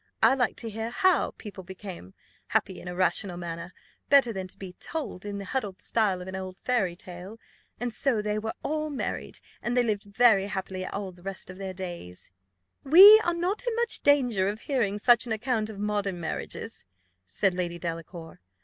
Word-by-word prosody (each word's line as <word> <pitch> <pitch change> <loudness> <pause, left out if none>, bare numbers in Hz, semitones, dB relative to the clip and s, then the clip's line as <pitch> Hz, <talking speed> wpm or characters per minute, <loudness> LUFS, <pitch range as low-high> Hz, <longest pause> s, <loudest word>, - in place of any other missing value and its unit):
I - - +7
like 260 -2 +1
to 230 - -5
hear 225 +2 -3
how 370 +8 +2
people 200 -3 -9
become 185 - -9 0.3
happy 190 - -1
in - - -10
a 180 - -5
rational 185 0 0
manner, 170 0 -6 0.4
better 270 -5 +5
than 190 -2 -4
to - - -9
be 190 -2 -8
told 270 - -6
in 200 -1 -4
the 200 - -6
huddled 205 -4 -3
style 200 -5 0
of - - -11
an 190 - -5
old 185 0 -6
fairy 205 -9 0
tale 180 +4 -10 0.4
and 245 -1 -3
so 255 -2 +2
they 210 0 -1
were 220 +1 -4
all 310 +1 -1
married, 285 - -4 0.2
and 240 +1 -1
they 245 - +5
lived 210 -3 -1
very 200 -1 +4
happily 190 -1 -4
all 200 -2 -4
the 175 0 -17
rest 195 0 -6
of 185 - -12
their 190 -1 -5
days." 175 - -7 0.5
"We 390 +9 +10
are 345 - +1
not 360 +5 -1
in 470 - 0
much 470 0 +1
danger 245 -10 +3
of 210 +2 -5
hearing 230 -8 0
such 240 +3 +4
an 230 - -1
account 220 -1 -1
of 215 - -8
modern 205 -3 -1
marriages," 165 - -5 0.4
said 140 - +1
Lady 175 -1 -2
Delacour. 165 0 -7
200 Hz, 195 wpm, -27 LUFS, 185-240 Hz, 0.5 s, We